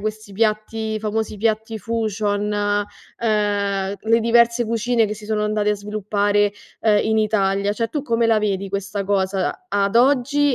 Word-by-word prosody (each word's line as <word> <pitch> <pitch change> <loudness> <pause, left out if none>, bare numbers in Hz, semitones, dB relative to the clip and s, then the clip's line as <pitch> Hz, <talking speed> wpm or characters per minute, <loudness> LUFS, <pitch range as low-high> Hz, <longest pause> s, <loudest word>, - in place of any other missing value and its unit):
questi 215 -1 -5
piatti 220 +1 -1
i 215 - -1
famosi 215 0 -2
piatti 220 +1 -1
fusion, 210 -1 -1 0.7
ehm, 205 -3 0
le 230 +1 +2
diverse 235 +1 +3
cucine 230 +1 +1
che 210 - -4
si 215 0 -12
sono 215 -1 0
andate 210 0 +1
a - - +2
sviluppare, 205 0 0 0.3
ehm, 210 -2 +3
in 220 0 +1
Italia. 200 -2 +1
Cioè, 230 +1 -2
tu 295 +2 -3
come 235 -3 +1
la 225 -1 +3
vedi 200 -2 -1
questa 200 +1 -3
cosa 190 -1 0 0.2
a 200 - +1
ad 210 +4 -1
oggi 280 +2 +3
215 Hz, 165 wpm, -21 LUFS, 205-225 Hz, 0.7 s, diverse